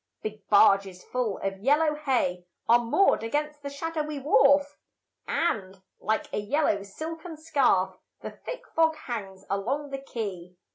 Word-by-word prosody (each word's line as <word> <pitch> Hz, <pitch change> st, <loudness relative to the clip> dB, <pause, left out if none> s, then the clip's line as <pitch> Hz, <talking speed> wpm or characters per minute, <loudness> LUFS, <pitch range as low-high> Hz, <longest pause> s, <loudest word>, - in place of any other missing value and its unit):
Big 215 Hz, -1 st, -7 dB
barges 195 Hz, -2 st, +4 dB
full 245 Hz, -6 st, -2 dB
of 195 Hz, 0 st, -2 dB
yellow 300 Hz, +7 st, +3 dB
hay 250 Hz, -12 st, 0 dB, 0.2 s
Are 235 Hz, +1 st, +6 dB
moored 240 Hz, +12 st, +3 dB
against 295 Hz, +6 st, -2 dB
the 280 Hz, -, -5 dB
shadowy 305 Hz, +1 st, -3 dB
wharf, 280 Hz, +1 st, +4 dB, 0.5 s
And, 195 Hz, -, -1 dB, 0.2 s
like 220 Hz, 0 st, 0 dB
a -, -, 0 dB
yellow 210 Hz, -1 st, +1 dB
silken 320 Hz, -, -7 dB
scarf, 250 Hz, -, +1 dB, 0.2 s
The -, -, -6 dB
thick -, -, -8 dB
fog 320 Hz, -1 st, +4 dB
hangs 205 Hz, -9 st, -6 dB
along 265 Hz, +9 st, -2 dB
the 275 Hz, -, -3 dB
quay. 190 Hz, -9 st, -6 dB
260 Hz, 140 wpm, -27 LUFS, 200-300 Hz, 0.5 s, Are